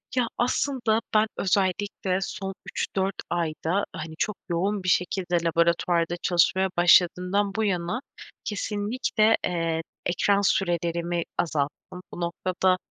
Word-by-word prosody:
Ya, 245 -2 +2
aslında 240 -2 +1
ben 215 +1 +4
özellikle, 190 0 0
son 195 0 -4 0.2
3-4 190 0 -1
ayda 170 +3 -1
hani, 160 0 -6
çok 210 -2 -1
yoğun 190 +3 0
bir 185 - 0
şekilde 180 -1 +1
laboratuvarda 170 +1 +2
çalışmaya 190 +2 +3
başladığımdan 180 +3 +4
bu 220 - +1
yana; 195 +4 -1 0.4
kesinlikle, 215 +1 +1
eee, 165 -2 -1 0.2
ekran 200 +3 +2
sürelerimi 170 -2 0
azalttım. 155 +3 -2
Bu 175 - -6
noktada, 185 +2 +1
185 Hz, 110 wpm, -26 LUFS, 170-205 Hz, 0.4 s, ben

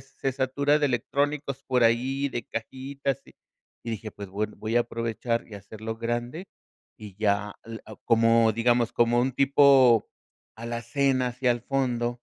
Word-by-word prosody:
se 135 0 -4
satura 140 +3 +1
de 145 - +3
electrónicos 140 +2 -1
por 125 -3 +1
ahí, 130 +5 +1
de 120 -3 -5
cajitas, 135 +3 -4
y - - -19 0.5
y 115 - -4
dije: 110 0 -5
"Pues, 100 -1 -9
bueno, 105 +2 -4
voy 110 +2 -4
a 120 - +5
aprovechar 115 0 -2
y 110 - -11
hacerlo 110 +2 -7
grande 120 +10 -4 0.5
y 105 -3 -10
ya". 105 -1 0
Eh, 115 -1 -7
ah, 110 - -10
como, 115 -1 +4
digamos, 120 +1 +1
como 120 0 +3
un 130 +2 +1
tipo 135 -3 +5 0.5
alacena, 120 +3 -1
así, 125 +1 -6
al 120 -1 +3
fondo, 120 -3 -1
120 Hz, 155 wpm, -26 LUFS, 115-135 Hz, 0.5 s, a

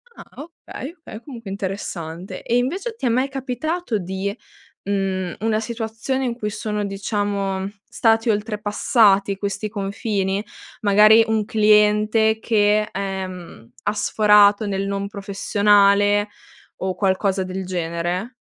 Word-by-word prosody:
Ah, - - -12 0.2
okay, 325 -2 -9
okay. 225 -8 -10
Comunque, 230 -8 -9
interessante. 190 -3 -5
E, 240 - +1
invece 370 - -2
ti 355 - -5
è 245 - +3
mai 255 +4 +1
capitato 270 +1 -3
di 190 +2 -4 0.5
mhmm, 190 -2 -2
una 220 0 +1
situazione 225 +3 -3
in 235 -2 -2
cui 210 -3 -3
sono, 210 0 -3
diciamo, 200 -1 -2 0.2
stati 225 0 +2
oltrepassati 205 -1 +2
questi 200 +1 -3
confini? 200 -1 -2 0.4
Magari, 215 +2 +6
un 220 -1 0
cliente 215 0 +3
che, 210 -1 +2
ehm, 185 -9 -6
ha 205 - 0
sforato 210 0 +4
nel 195 -1 -2
non 200 0 -2
professionale 205 0 +2 0.5
o 185 -1 -3
qualcosa 190 0 +1
del 185 +1 -5
genere? 180 +6 -3
205 Hz, 120 wpm, -21 LUFS, 195-220 Hz, 0.5 s, Magari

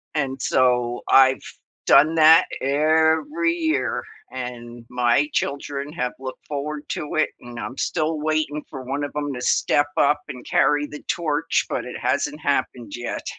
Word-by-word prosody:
And 135 -3 -2
so, 125 -1 +1
I've 135 0 +5 0.4
done 160 +2 +6
that 160 +1 +7 0.2
every 160 - +2
year, 330 -2 -1 0.3
and 120 -2 -7
my 125 +3 +2
children 140 0 -3
have 125 -6 -3
looked 130 -1 -8
forward 150 +1 -4
to 150 - -4
it, 155 - +2
and 120 -1 -9
I'm 110 +5 -6
still 155 -2 -1
waiting 155 -1 -1
for 135 -3 -8
one 135 +3 -3
of 145 - -4
'em 145 -1 -2
to 125 - -6
step 145 +3 +2
up 145 +1 +3
and 125 - -9
carry 145 +1 +2
the 150 - -10
torch, 155 -4 0
but - - -3
it - - -7
hasn't - - -1
happened 120 -2 -2
yet. 120 0 -5
145 Hz, 155 wpm, -22 LUFS, 125-155 Hz, 0.4 s, that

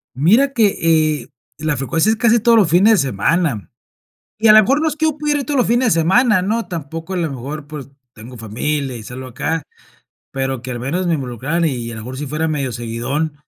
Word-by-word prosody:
Mira 220 - +3
que, 165 -8 +2
eh, - - -14 0.3
la 150 -2 -2
frecuencia, 165 +9 0
es 220 - +2
casi 235 0 +3
todos 230 +1 +4
los 200 -7 +4
fines 185 +7 +5
de 135 - -1
semana, 135 - -1 0.7
y 220 0 +3
a - - +9
la 215 - +8
mejor 275 +8 +1
no 320 - +1
es 305 - -4
que 315 - -1
yo 310 -2 0
pudiera 295 -1 0
ir - - -4
todos 285 -2 -1
los 245 - +2
fines 240 -1 +2
de 165 - +2
semana, 210 +4 +3
¿no? 220 +5 -1
Tampoco 165 0 -6
a - - -2
lo 165 -2 -1
mejor, 140 +3 -7
pues, 145 -2 -9 0.2
tengo 120 +2 -12
familia 130 +4 -3
y 110 - -9
salgo 130 +3 -8
acá, 145 +5 -3 0.7
pero 135 -2 -3
que 125 - -5
al 120 - -5
menos 175 +8 -2
me 170 - +1
involucraran 135 +5 -2
y 120 -6 -2
a - - -7
lo 110 - -7
mejor 130 +4 -7
si 150 - -4
fuera 155 +3 -2
medio 140 -5 -2
seguidón, 120 +7 -3
155 Hz, 230 wpm, -18 LUFS, 130-215 Hz, 0.7 s, a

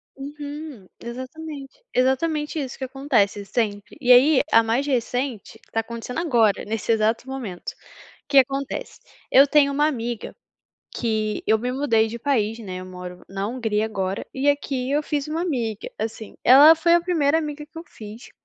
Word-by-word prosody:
Uhum. 290 -5 -8
Exatamente, 275 - -8
exatamente 295 +4 0
isso 265 -3 -5
que 265 - -6
acontece, 250 -7 0
sempre. 205 0 -3
E 250 -2 +2
aí, 265 +3 +7
a 225 - +7
mais 230 +5 0
recente 250 -3 -2
tá 225 - 0
acontecendo 235 +5 -5
agora, 235 - +2
nesse 220 +1 -2
exato 225 +3 +1
momento. 240 -10 -6
O - - -23 0.5
que 280 - +3
acontece? 275 +1 +1 0.3
Eu 275 +2 +7
tenho 285 -1 +4
uma 295 +2 +2
amiga, 240 -5 -4 0.6
que 215 -2 -2
eu 220 +1 +4
me 250 +2 -2
mudei 235 -5 +2
de 235 +2 -6
país, 230 -4 0
né. 185 -4 -6
Eu - - -8
moro 180 -1 -9
na 195 +1 -3
Hungria 220 -3 -1
agora, 195 -3 -3
e 275 +2 +1
aqui 270 -3 -1
eu 295 +1 +1
fiz 290 -1 -2
uma 320 +2 -2
amiga, 235 - -3
assim, 220 -1 -5
ela 290 +6 +9
foi 335 +1 +3
a 345 - +3
primeira 320 -4 +2
amiga 300 -1 -4
que 320 - -15
eu 330 - -7
fiz 215 +2 -11
255 Hz, 170 wpm, -23 LUFS, 220-290 Hz, 0.6 s, ela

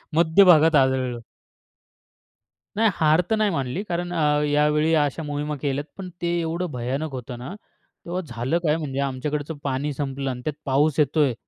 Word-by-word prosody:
मध्य 165 +4 +5
भागात 160 -2 +6
आदळलो. 130 -3 +1 1.5
नाही 220 +1 +3
हार 155 +2 +4
तर 220 - +3
नाही 215 -1 +2
मानली 140 +2 -2
कारण 175 0 -2
अ, 150 -3 +2
यावेळी 150 +2 +2
अशा 145 +2 -2
मोहिमा 150 0 -3
केल्यात, 140 0 -1
पण 190 -2 -6
ते 175 - -1
एवढं 170 +1 -2
भयानक 135 +5 -3
होतं 125 -2 -7
ना, 130 +9 -7 0.5
तेव्हा 180 +2 -3
झालं 120 +6 -1
काय 155 -1 +2
म्हणजे 140 -4 -4
आमच्याकडचं 145 +3 -3
पाणी 140 +2 -1
संपलं 135 -1 -3
आणि 125 -1 -5
त्यात 155 - -1
पाऊस 140 +2 +2
येतोय. 145 -2 +3
150 Hz, 160 wpm, -23 LUFS, 135-160 Hz, 1.5 s, भागात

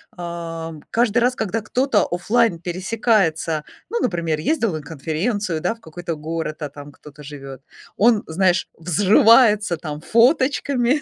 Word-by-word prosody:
А, 165 -2 -6 0.2
каждый 235 0 +1
раз, 245 +1 +3
когда 220 -1 -2
кто-то 255 +6 +1
офлайн 205 +1 +1
пересекается, 180 -4 0 0.3
ну, 470 - -2
например, 165 - -1
ездил 225 - 0
на 155 - -4
конференцию, 165 - -2
да, 225 - -1
в 230 - -21
какой-то 170 +1 -6
город, 160 +1 -5
а 150 - -3
там 145 +1 -11
кто-то 150 0 -15
живет, 135 -2 -9 0.3
он, 220 0 +4
знаешь, 180 +2 +1
взрывается 210 - +4
там 150 -2 -6
фоточками, 260 - +2
175 Hz, 135 wpm, -21 LUFS, 160-230 Hz, 0.3 s, он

